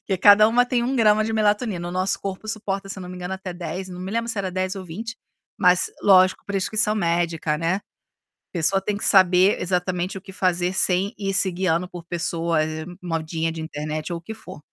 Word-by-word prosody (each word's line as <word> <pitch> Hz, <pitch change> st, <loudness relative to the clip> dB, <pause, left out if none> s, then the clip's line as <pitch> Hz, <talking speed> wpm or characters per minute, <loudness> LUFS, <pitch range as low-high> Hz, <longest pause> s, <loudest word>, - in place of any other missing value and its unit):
porque 190 Hz, -, -1 dB
cada 205 Hz, +3 st, +7 dB
uma 245 Hz, +2 st, +3 dB
tem 245 Hz, -1 st, 0 dB
1 260 Hz, +3 st, -1 dB
grama 215 Hz, -2 st, +4 dB
de 225 Hz, -, -2 dB
melatonina, 210 Hz, -4 st, 0 dB
o -, -, -5 dB
nosso 185 Hz, +1 st, 0 dB
corpo 195 Hz, +2 st, -6 dB
suporta 200 Hz, -2 st, -3 dB
se 195 Hz, -, -7 dB
eu -, -, -7 dB
não 180 Hz, -, -8 dB
me 180 Hz, -, -8 dB
engano 180 Hz, +1 st, -4 dB
até 190 Hz, -1 st, -7 dB
10, 175 Hz, +2 st, -6 dB
não 180 Hz, 0 st, -8 dB
me 185 Hz, +1 st, -5 dB
lembro 230 Hz, +2 st, -2 dB
se 220 Hz, -, -4 dB
era 190 Hz, -1 st, -2 dB
dez 185 Hz, +1 st, -2 dB
ou 190 Hz, -1 st, -7 dB
20, 220 Hz, +7 st, -7 dB, 0.4 s
mas 180 Hz, -2 st, +3 dB
lógico 185 Hz, -2 st, +5 dB
prescrição 210 Hz, +2 st, +1 dB
médica, 170 Hz, -5 st, 0 dB
né. 170 Hz, +5 st, 0 dB, 0.7 s
Pessoa 195 Hz, +3 st, +2 dB
tem 205 Hz, +1 st, -2 dB
que -, -, -3 dB
saber 185 Hz, 0 st, +5 dB
exatamente 180 Hz, +1 st, -1 dB
o -, -, -9 dB
que 190 Hz, -, -12 dB
fazer 180 Hz, -2 st, 0 dB
sem 190 Hz, +2 st, +2 dB
ir 195 Hz, -1 st, -2 dB
se 190 Hz, 0 st, +3 dB
guiando 180 Hz, -1 st, 0 dB
por 175 Hz, -2 st, -9 dB
pessoa, 170 Hz, -1 st, -1 dB
eh, 155 Hz, 0 st, -4 dB, 0.2 s
modinha 165 Hz, -1 st, -2 dB
de 160 Hz, -, -6 dB
internet 155 Hz, +1 st, -5 dB
ou 170 Hz, -, -3 dB
o -, -, -20 dB
que 200 Hz, +6 st, -7 dB
for. 190 Hz, -5 st, -11 dB
185 Hz, 220 wpm, -23 LUFS, 175-200 Hz, 0.7 s, cada